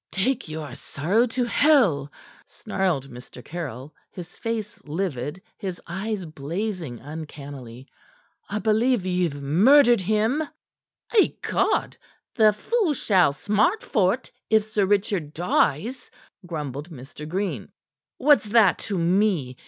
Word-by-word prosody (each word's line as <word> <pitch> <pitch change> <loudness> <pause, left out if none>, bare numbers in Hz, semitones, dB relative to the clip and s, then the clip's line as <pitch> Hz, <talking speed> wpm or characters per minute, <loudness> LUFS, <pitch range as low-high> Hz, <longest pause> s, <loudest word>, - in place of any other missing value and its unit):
"Take 230 +1 -1
your 155 -4 -6
sorrow 180 - 0
to 245 +2 -1
hell," 235 - +3 0.4
snarled 180 - -2
Mr. 125 0 -12
Caryll, 150 -4 -6 0.2
his 175 -1 -10
face 225 -2 -4
livid, 150 0 -4 0.2
his 190 -4 -5
eyes 195 +2 -4
blazing 160 - -4
uncannily. 140 -4 -9 0.6
"I 210 - -2
believe 220 0 +2
ye've 180 -5 0
murdered 230 - +5
him." 220 - +1 0.7
"Ecod! 420 - +1 0.4
the 215 -2 +5
fool 345 - 0
shall 185 - +3
smart 210 - +1
for't 215 +2 0 0.2
if 220 -1 +4
Sir 210 -2 0
Richard 195 -6 0
dies," 180 - 0 0.4
grumbled 150 -2 -5
Mr. 150 +1 -10
Green. 180 - -3 0.5
"What's 290 -3 +4
that 210 -3 +4
to 200 - -1
me? 175 -6 +1
185 Hz, 115 wpm, -24 LUFS, 150-215 Hz, 0.7 s, murdered